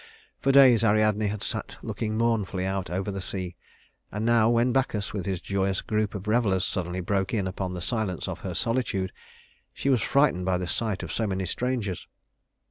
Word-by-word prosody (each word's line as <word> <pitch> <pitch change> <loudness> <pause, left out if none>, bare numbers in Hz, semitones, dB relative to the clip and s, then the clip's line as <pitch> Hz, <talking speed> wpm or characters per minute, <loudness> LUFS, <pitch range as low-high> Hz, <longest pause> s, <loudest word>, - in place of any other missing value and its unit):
For 135 - +2
days 130 -5 +7
Ariadne 110 -1 +3
had 105 0 -3
sat - - -3
looking 110 0 -3
mournfully 110 -5 0
out 95 -2 -2
over 95 +3 -2
the 95 0 -4
sea; 95 -2 -4 0.6
and 105 +2 -2
now 115 -1 +4
when 120 +1 +3
Bacchus, 120 -6 0
with 100 -3 -3
his 95 -3 -1
joyous 95 +1 -1
group 110 -1 -1
of 100 +1 -6
revelers, 105 -5 +2
suddenly 90 0 -2
broke 95 +3 0
in 100 -3 0
upon 95 0 -3
the 90 - -5
silence 105 -3 -1
of - - -4
her - - -5
solitude, 115 -6 0 0.6
she 140 - -1
was 125 -5 +3
frightened 135 -11 +2
by 90 -1 +2
the 90 - -3
sight 105 +2 -2
of - - -5
so 110 - 0
many 95 -1 -1
strangers. 115 -3 -2
105 Hz, 190 wpm, -27 LUFS, 95-115 Hz, 0.6 s, days